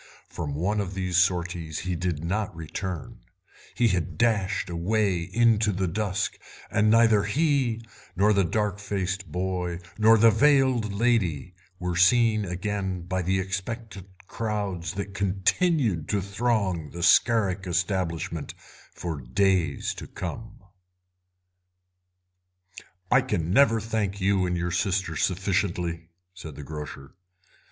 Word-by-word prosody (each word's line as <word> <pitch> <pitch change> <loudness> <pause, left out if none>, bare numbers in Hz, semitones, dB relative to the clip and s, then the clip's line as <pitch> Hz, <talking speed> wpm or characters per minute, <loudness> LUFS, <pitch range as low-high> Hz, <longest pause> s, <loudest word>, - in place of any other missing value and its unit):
From 75 -3 -5
one 100 +7 0
of 95 -1 -5
these 90 -2 -1
sorties 90 -3 0
he 90 +1 -2
did 85 -2 -2
not 105 +1 -2
return; 85 +1 -6 0.6
he 120 -1 +3
had 90 -5 -2
dashed 110 -6 +1
away 95 +2 0
into 110 +3 +2
the 95 -1 -1
dusk, 100 +2 -2 0.3
and 105 0 +3
neither 110 -2 +5
he 125 -2 +1 0.3
nor 105 +4 +4
the 100 -1 +3
dark 105 +2 -1
faced 95 -3 -3
boy 90 0 -2 0.2
nor 110 +1 +6
the 115 +1 +6
veiled 130 -3 +3
lady 100 - 0 0.2
were 90 -1 -3
seen 110 +3 +4
again 95 0 -3
by 95 +1 -2
the 95 +2 0
expectant 95 +1 -5 0.2
crowds 100 -6 -3
that 100 0 -5
continued 100 - +1
to 105 - +1
throng 100 -5 -1
the 85 +4 -6
Scarrick 95 -1 +3
establishment 90 -1 -2 0.4
for 80 -5 -4
days 85 +2 +1
to - - -9
come. 100 +4 -7 2.5
"I 130 - +6
can 90 -9 -2
never 115 -2 +5
thank 105 -3 -2
you 95 -1 +2
and 90 0 -1
your 85 0 -2
sister 90 -1 0
sufficiently," 90 -2 -1 0.2
said 80 -6 -9
the 75 - -8
grocer. 75 -2 -8
95 Hz, 125 wpm, -26 LUFS, 90-110 Hz, 2.5 s, nor